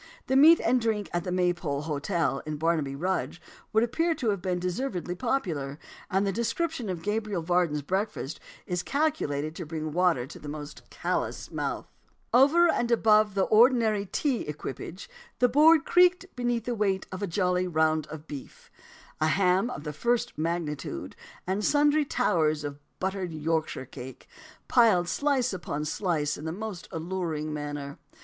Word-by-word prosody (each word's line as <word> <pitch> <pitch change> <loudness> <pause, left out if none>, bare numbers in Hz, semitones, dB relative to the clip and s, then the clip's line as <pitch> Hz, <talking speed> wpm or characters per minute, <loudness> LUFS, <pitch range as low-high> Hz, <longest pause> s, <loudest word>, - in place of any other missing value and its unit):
The 265 - 0
meat 315 +5 +8
and 245 +2 +2
drink 220 -3 -1
at 175 0 -1
the 180 - -2
Maypole 175 -5 0
Hotel, 150 0 -1
in 155 -1 -3
Barnaby 155 -3 0
Rudge, 180 +2 -2 0.3
would 220 +1 +3
appear 330 +8 +1
to 235 -7 0
have 200 -3 -3
been 180 0 -1
deservedly 180 0 -3
popular; 170 - -2 0.3
and 190 +2 +1
the 195 - +1
description 240 - -2
of 175 -3 -4
Gabriel 210 -4 -1
Varden's 170 -4 +1
breakfast 190 -3 -2 0.3
is 180 -1 -2
calculated 175 - -1
to 175 - -6
bring 155 -1 -4
water 175 -8 +2
to - - -11
the 150 - -8
most 150 0 -8
callous - - -3
mouth: - - -3 0.5
"Over 290 +8 +6
and 240 -7 +1
above 215 -3 +4
the 195 - +3
ordinary 220 -3 +4
tea 265 +3 0
equipage 150 - -6 0.3
the 250 - +4
board 305 +4 +5
creaked 360 +1 +4
beneath 240 -2 -1
the 245 - -1
weight 200 -4 0
of 185 +1 -6
a 200 - -1
jolly 180 0 +1
round 160 -2 +1
of 155 +1 -9
beef, 145 -4 -10 0.5
a 155 - +2
ham 185 +6 +2
of 150 - -6
the 150 -1 -5
first 235 - 0
magnitude, 155 - -3 0.3
and 190 +3 -1
sundry 295 +2 +3
towers 155 - +1
of 145 -1 -5 0.2
buttered 190 -2 -2
Yorkshire 160 -2 -2
cake, 130 0 -10 0.4
piled 215 -8 +4
slice 260 - +1
upon 150 -4 -4
slice 155 -3 -1
in 160 +3 -5
most 210 -5 -6
alluring 160 -3 -3
order. 145 -1 -5
180 Hz, 160 wpm, -28 LUFS, 155-230 Hz, 0.5 s, meat